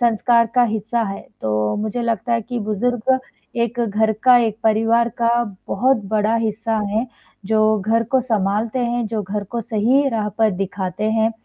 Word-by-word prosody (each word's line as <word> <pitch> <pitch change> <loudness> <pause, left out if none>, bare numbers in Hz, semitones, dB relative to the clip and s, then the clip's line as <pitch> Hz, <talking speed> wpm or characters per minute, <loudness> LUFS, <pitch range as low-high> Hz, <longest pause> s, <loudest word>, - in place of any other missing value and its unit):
संस्कार 235 0 +3
का 250 - +5
हिस्सा 225 +1 -1
है, 195 -2 -4 0.2
तो 105 -1 0
मुझे 215 +3 -3
लगता 230 0 -1
है 230 - +2
कि 245 +2 -4
बुज़ुर्ग 245 +4 0 0.4
एक 235 +1 -1
घर 220 0 +1
का 250 -1 +8
एक 225 -3 0
परिवार 225 +2 +3
का 235 0 +3 0.4
बहुत 260 +5 +2 0.2
बड़ा 215 +2 +2
हिस्सा 225 0 -1
हैं 225 +4 0 0.4
जो 215 0 +3
घर 225 +3 +1
को 260 - +4
सँभालते 220 +1 -1
हैं 240 -1 -1
जो 220 -1 -2
घर 205 +1 -4
को 235 - -1
सही 235 +5 +2
राह 215 -3 -1
पर 220 -1 +4
दिखाते 195 +2 -3
हैं। 225 0 +2
225 Hz, 175 wpm, -20 LUFS, 210-235 Hz, 0.4 s, का